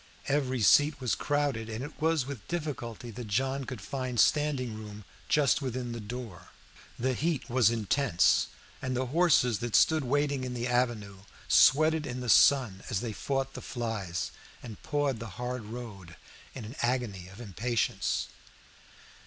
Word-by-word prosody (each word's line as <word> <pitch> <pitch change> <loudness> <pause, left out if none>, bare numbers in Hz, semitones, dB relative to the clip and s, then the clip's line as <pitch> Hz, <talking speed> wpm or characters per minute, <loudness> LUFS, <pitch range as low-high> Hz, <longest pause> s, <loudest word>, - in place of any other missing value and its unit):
Every 130 -4 0
seat 145 +6 +5
was 125 -4 0
crowded, 145 -6 -1
and 110 +3 -4
it 145 - -7
was 160 -4 +2
with 135 -6 -8
difficulty 130 -8 -4
that 115 +1 -7
John 130 +6 -1
could 125 -6 -7
find 130 +2 -3
standing 140 -5 +2
room 105 -1 -9 0.2
just 145 -1 +3
within 125 -2 -3
the 115 - -5
door. 105 -5 -8 0.5
The 130 +2 0
heat 155 +3 -1
was 125 -2 +5
intense, 115 -3 +2 0.3
and 130 -1 -2
the 130 - 0
horses 145 - +4
that 120 0 -2
stood 160 -2 +4
waiting 140 +1 0
in 125 -1 -4
the 120 0 -2
avenue, 120 -6 -1 0.3
sweated 155 +2 +5
in 125 0 -4
the 125 -1 -4
sun 120 -7 +5
as 105 -6 -1
they 115 -3 -4
fought 135 +3 -2
the - - -7
flies, 110 -8 -3 0.3
and 115 -4 -9
pawed 145 -5 -1
the 115 - -6
hard 125 -2 -4
road 105 -7 -9 0.4
in 125 -5 -6
an 115 +6 -9
agony 120 -7 -1
of 95 +3 -13
impatience. 115 +2 -1
125 Hz, 160 wpm, -29 LUFS, 110-140 Hz, 0.5 s, seat